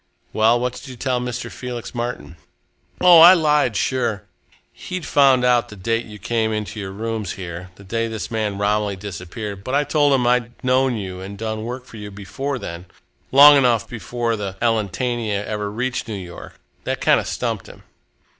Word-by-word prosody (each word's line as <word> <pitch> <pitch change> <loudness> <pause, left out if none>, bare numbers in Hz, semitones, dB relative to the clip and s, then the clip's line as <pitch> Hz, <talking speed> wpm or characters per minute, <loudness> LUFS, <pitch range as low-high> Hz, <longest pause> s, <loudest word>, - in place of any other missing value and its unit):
"Well, 115 +2 +4
what 125 0 -1
did 125 +3 -10
you 130 - -8
tell 125 0 -1
Mr. 125 0 -4
Felix 125 -2 -7
Martin?" 120 -8 -5 0.6
"Oh, 180 -2 +8
I 175 +3 +10
lied, 150 - +2
sure! 120 -7 -1 0.5
He'd 185 -3 -6
found 135 -3 +4
out 125 -1 +3
the 105 - -10
date 115 +5 -2
you 105 -1 -10
came 110 +2 -1
into 105 0 -4
your 95 -2 -5
rooms 110 +1 -4
here 90 0 -7
the 100 - -15
day 115 +4 -2
this 110 0 -5
man 105 -3 -2
Romilly 105 0 0
disappeared 100 +1 -7
but 130 +4 -2
I 145 - +3
told 145 -1 +2
him 130 -2 +2
that 120 - +3
I'd 120 0 -2
known 130 0 +2
you 95 -3 -6
and 100 +1 -8
done 110 0 -4
work 125 +2 -6
for 115 - -12
you 105 -1 -7
before 105 +8 -5
then 85 -6 -7 0.5
long 145 +2 +9
enough 120 -5 +2
before 120 0 -3
the 100 -3 -5
Elletania 110 -1 -1
ever 105 -1 -3
reached 125 +4 -3
New 110 - -4
York. 90 -3 -10 0.2
That - - -2
kind - - +4
of - - -5
stumped - - -3
him." - - -14
115 Hz, 190 wpm, -21 LUFS, 105-125 Hz, 0.6 s, I